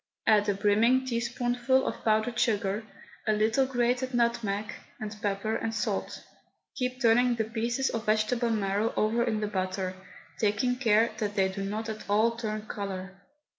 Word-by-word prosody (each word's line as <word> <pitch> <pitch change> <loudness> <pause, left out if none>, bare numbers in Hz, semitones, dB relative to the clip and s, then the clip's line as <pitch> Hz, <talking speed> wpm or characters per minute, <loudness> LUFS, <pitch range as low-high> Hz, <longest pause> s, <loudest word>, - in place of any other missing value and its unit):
Add 210 -1 +4
a 200 - +1
brimming 225 +6 +3
teaspoonful 245 +1 0
of - - -4
powdered 220 +2 +1
sugar, 210 -3 +1 0.4
a 215 - +4
little 220 +5 +2
grated 250 0 0
nutmeg, 220 -3 0 0.3
and 215 -1 -5
pepper 205 +1 -1
and 225 0 -2
salt. 205 -2 -2 0.5
Keep 255 0 -2
turning 245 0 +4
the 225 - 0
pieces 235 +4 -1
of 225 -1 -4
vegetable 220 +3 +2
marrow 210 0 0
over 225 +2 +2
in 220 -2 -1
the 210 - 0
butter, 185 -1 -2 0.5
taking 215 +4 +1
care 230 -2 +3
that 205 -1 -2
they 190 -1 +2
do 195 +1 -5
not 215 +3 -3
at 215 -2 -7
all 215 +3 +4
turn 215 -2 -4
colour. 195 -2 -6
220 Hz, 160 wpm, -28 LUFS, 205-240 Hz, 0.5 s, Add